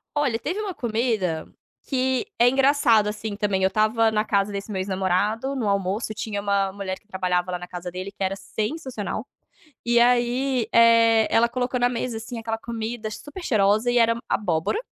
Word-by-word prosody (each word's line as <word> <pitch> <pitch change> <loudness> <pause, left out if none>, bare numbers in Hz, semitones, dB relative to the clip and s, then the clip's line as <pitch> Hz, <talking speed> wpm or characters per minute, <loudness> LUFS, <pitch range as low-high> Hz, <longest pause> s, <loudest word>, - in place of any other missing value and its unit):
Olha, 270 -6 +1
teve 340 - -3
uma 410 -3 -3
comida 220 - -1 0.4
que 260 -2 0
é 240 - +6
engraçado, 265 -5 +4
assim, 210 0 -4
também 200 -3 0
eu 190 - +5
estava 220 +2 +2
na 215 0 0
casa 200 -1 +1
desse 200 +2 -5
meu 190 - -2
ex-namorado, 200 +7 0
no 225 -6 -1
almoço 200 +3 -1
tinha 210 -1 -4
uma 200 -1 0
mulher 190 -1 -5
que - - -38
trabalhava 180 -2 -1
lá 180 - -3
na 180 - -8
casa 180 0 -6
dele 185 +2 -6
que 200 - -19
era 190 +1 0
sensacional, 215 +3 -4 0.6
e 240 0 +4
aí, 245 +1 +2
eh, 230 -1 +5
ela 235 +1 +5
colocou 245 +1 -2
na 245 - +4
mesa, 235 -1 -3
assim, 230 +1 -7
aquela 225 0 -3
comida 225 -1 -5
super 290 - -9
cheirosa 215 -3 +2
e 245 - 0
era 230 -1 +4
abóbora 175 - 0
220 Hz, 180 wpm, -24 LUFS, 200-240 Hz, 0.6 s, é